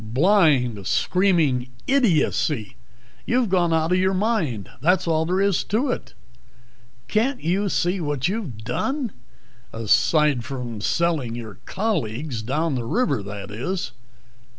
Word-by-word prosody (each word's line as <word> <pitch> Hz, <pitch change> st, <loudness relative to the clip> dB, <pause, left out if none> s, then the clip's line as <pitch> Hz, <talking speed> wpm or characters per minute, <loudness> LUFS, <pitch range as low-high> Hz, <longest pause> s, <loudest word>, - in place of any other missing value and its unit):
"Blind, 130 Hz, -, +2 dB
screaming 155 Hz, -, +2 dB, 0.2 s
idiocy. 165 Hz, -, +1 dB, 0.5 s
You've 245 Hz, -3 st, +2 dB
gone 175 Hz, -2 st, +2 dB
out 160 Hz, +1 st, +1 dB
of 180 Hz, -, +3 dB
your 190 Hz, +1 st, +2 dB
mind 185 Hz, -, 0 dB
that's 180 Hz, +4 st, +2 dB
all 160 Hz, -1 st, +1 dB
there 185 Hz, +2 st, +1 dB
is 200 Hz, -2 st, +2 dB
to 245 Hz, +6 st, 0 dB
it. -, -, -6 dB, 0.9 s
Can't 245 Hz, +5 st, 0 dB
you 190 Hz, +5 st, +1 dB
see 180 Hz, +1 st, 0 dB
what 145 Hz, -3 st, -1 dB
you've 190 Hz, -, -3 dB
done? 255 Hz, -, -2 dB, 0.6 s
Aside 130 Hz, +4 st, +2 dB
from 125 Hz, -5 st, -5 dB
selling 150 Hz, -4 st, 0 dB
your 110 Hz, -5 st, -8 dB
colleagues 145 Hz, -, -2 dB
down 150 Hz, +7 st, -1 dB
the 125 Hz, -3 st, -2 dB
river, 240 Hz, -, +1 dB
that 100 Hz, 0 st, -7 dB
is?" 175 Hz, -, -3 dB
160 Hz, 130 wpm, -23 LUFS, 120-190 Hz, 0.9 s, of